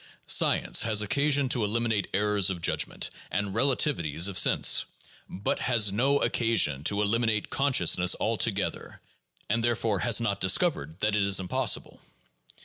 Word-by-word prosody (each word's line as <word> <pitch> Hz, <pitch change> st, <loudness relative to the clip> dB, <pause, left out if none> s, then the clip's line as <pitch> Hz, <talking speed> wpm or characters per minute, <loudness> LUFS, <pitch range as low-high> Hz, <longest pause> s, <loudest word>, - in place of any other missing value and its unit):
Science -, -, +2 dB
has 105 Hz, -1 st, +1 dB
occasion 140 Hz, +4 st, 0 dB
to 125 Hz, -3 st, 0 dB
eliminate 110 Hz, 0 st, -1 dB
errors 105 Hz, -1 st, +1 dB
of 95 Hz, -2 st, -4 dB
judgment 85 Hz, -, -2 dB, 0.2 s
and 100 Hz, 0 st, -3 dB
relativities 110 Hz, -, 0 dB
of 100 Hz, -, -6 dB
sense, -, -, +3 dB, 0.4 s
but 95 Hz, -, -3 dB
has 115 Hz, -5 st, +2 dB
no 135 Hz, +8 st, +1 dB
occasion 115 Hz, -, 0 dB
to 100 Hz, +5 st, 0 dB
eliminate 110 Hz, 0 st, -1 dB
consciousness 90 Hz, -, +2 dB
altogether; -, -, -2 dB, 0.5 s
and 115 Hz, +2 st, -1 dB
therefore 115 Hz, -4 st, 0 dB
has 120 Hz, +1 st, +2 dB
not 100 Hz, -4 st, -2 dB
discovered 95 Hz, -, 0 dB
that 105 Hz, 0 st, +1 dB
it 105 Hz, -, +1 dB
is 100 Hz, 0 st, +2 dB
impossible. 90 Hz, -1 st, -2 dB
105 Hz, 140 wpm, -27 LUFS, 100-120 Hz, 0.5 s, sense